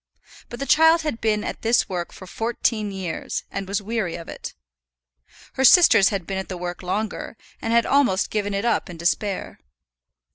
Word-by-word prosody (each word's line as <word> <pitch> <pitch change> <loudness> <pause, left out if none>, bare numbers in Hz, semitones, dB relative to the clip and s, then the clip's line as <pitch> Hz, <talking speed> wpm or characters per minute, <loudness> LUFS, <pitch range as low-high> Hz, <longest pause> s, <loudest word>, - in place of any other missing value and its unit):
But 240 - -8
the 275 - -2
child 320 +3 +5
had 300 -7 -3
been 215 -1 +1
at - - -5
this 230 +1 +2
work 175 -2 -4
for 185 - -11
fourteen 225 +1 -2
years, 190 -4 -4
and 195 - -4
was 200 +1 -2
weary 215 -5 -2
of 165 - -8
it. - - -8 1.0
Her 265 - -1
sisters 265 - +7
had 195 -5 -3
been 190 +1 -3
at 190 - -6
the 185 - -5
work 175 0 -5
longer, 205 +4 -4 0.2
and 225 - -2
had 235 0 +4
almost 260 -9 +2
given 205 -1 -1
it 200 +3 -2
up 230 -3 0
in 175 - -8
despair. 185 +4 -2
205 Hz, 185 wpm, -23 LUFS, 190-235 Hz, 1.0 s, sisters